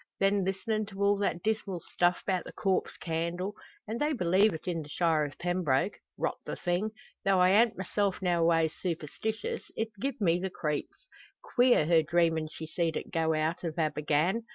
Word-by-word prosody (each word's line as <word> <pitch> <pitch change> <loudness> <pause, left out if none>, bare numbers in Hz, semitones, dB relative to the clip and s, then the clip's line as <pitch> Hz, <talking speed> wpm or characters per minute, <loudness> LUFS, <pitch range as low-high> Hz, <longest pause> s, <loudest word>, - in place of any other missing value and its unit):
Then 195 0 +3
listenin' 210 +3 -1
to 200 -1 -4
all 200 0 +4
that 175 -4 -1
dismal 215 -4 -1
stuff 175 +1 0
'bout 185 -3 0
the - - -8
corpse 190 -2 0
candle. 170 +4 -2 0.3
An' 225 +2 -3
they 300 +1 +1
believe 195 -1 +3
it 160 +1 -7
in 170 -2 -1
the 150 - -10
shire 160 -2 +2
o' 145 - -5
Pembroke! 175 -1 0 0.2
Rot - - -1
the - - -4
thing! 180 +4 -1 0.3
Tho' 195 -1 +3
I 180 0 +6
an't 225 +2 +4
myself 195 +1 -1
noways 165 -3 +2
superstishus, 215 - -3 0.2
it 225 0 -1
gi'ed 275 +3 -2
me 175 -3 +3
the 190 +1 -2
creeps. 150 - -4 0.4
Queer, 250 - +4
her 165 0 +5
dreamin' 160 0 +1
she 160 - -7
seed 165 0 -1
it - - -6
go 160 -1 +2
out 155 +3 -1
o' 165 - -1
Abergann! 155 +7 +1
180 Hz, 180 wpm, -30 LUFS, 165-205 Hz, 0.4 s, I